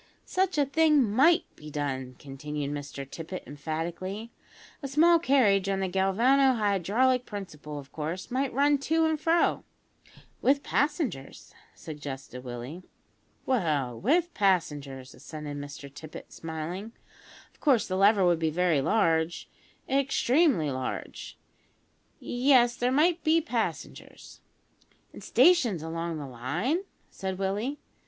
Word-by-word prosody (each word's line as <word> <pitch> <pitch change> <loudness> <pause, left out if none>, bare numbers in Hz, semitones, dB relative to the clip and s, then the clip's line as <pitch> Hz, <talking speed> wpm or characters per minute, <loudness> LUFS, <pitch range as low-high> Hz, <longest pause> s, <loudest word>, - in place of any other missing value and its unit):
"Such 375 -2 0
a 290 - +4
thing 300 0 +4
might 320 - +5
be 150 - -11
done," 135 -3 -4
continued 145 +1 -5
Mr 145 -1 -6
Tippet 165 +6 -7
emphatically; 170 +9 -5 0.5
"a 275 - -4
small 330 +5 +5
carriage 210 - +3
on 195 -1 0
the 190 - 0
galvano 230 +9 +3
hydraulic 220 +5 +2
principle, 155 -8 -7
of 140 -1 -10
course 160 +7 -5
might 265 +1 0
run 285 +2 +3
to 320 +3 +1
and 315 -1 0
fro 335 +2 +2 0.4
" - - -25
"With 280 +1 +3
passengers," 285 - -2 0.2
suggested 135 -4 -8
Willie. 125 +7 -7 0.6
"Well 150 - 0
with 335 - +2
passengers," 145 -9 -1
assented 150 -2 -8
Mr 145 0 -8
Tippet, 155 +1 -10
smiling. 165 +7 -6 0.6
"Of - - -29
course, 260 -8 +3
the 185 - -2
lever 200 0 +4
would 175 -2 +3
be 160 -1 +1
very 165 -2 +2
large 165 -2 +1 0.4
extremely 270 - +2
large. 130 -1 -5 0.8
Yes, 245 -1 +3
there 245 +1 0
might 320 +4 +2
be 320 +1 +4
passengers." 330 - -5 0.7
"An' - - -11
stations 240 - +3
along 165 0 -4
the 145 - -6
line?" 160 - -2 0.3
said 190 -1 -4
Willie. 205 +9 -2
190 Hz, 125 wpm, -28 LUFS, -, 0.8 s, might